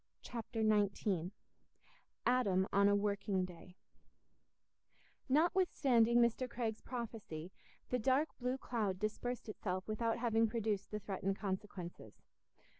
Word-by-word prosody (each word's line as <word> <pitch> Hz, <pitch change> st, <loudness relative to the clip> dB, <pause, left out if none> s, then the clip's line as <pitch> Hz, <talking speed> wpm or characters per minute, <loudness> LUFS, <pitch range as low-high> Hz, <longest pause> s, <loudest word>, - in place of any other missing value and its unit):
Chapter 230 Hz, -1 st, -3 dB
XIX 200 Hz, -4 st, +2 dB, 1.0 s
Adam 200 Hz, -7 st, +3 dB
on 200 Hz, 0 st, +5 dB
a 205 Hz, -, +4 dB
Working 200 Hz, -2 st, 0 dB
Day 180 Hz, 0 st, -12 dB, 1.5 s
Notwithstanding 275 Hz, -7 st, +4 dB
Mr. 240 Hz, +2 st, +3 dB
Craig's 225 Hz, -3 st, -3 dB
prophecy, 215 Hz, -9 st, -6 dB, 0.4 s
the 250 Hz, -, +2 dB
dark 265 Hz, +7 st, +3 dB
blue 250 Hz, +1 st, -1 dB
cloud 215 Hz, -8 st, -1 dB
dispersed 215 Hz, +4 st, -3 dB
itself 185 Hz, -3 st, -3 dB
without 225 Hz, +1 st, 0 dB
having 230 Hz, -1 st, +3 dB
produced 215 Hz, -3 st, -1 dB
the 210 Hz, -, -3 dB
threatened 195 Hz, -1 st, -2 dB
consequences. 190 Hz, -3 st, -5 dB
215 Hz, 110 wpm, -37 LUFS, 195-240 Hz, 1.5 s, on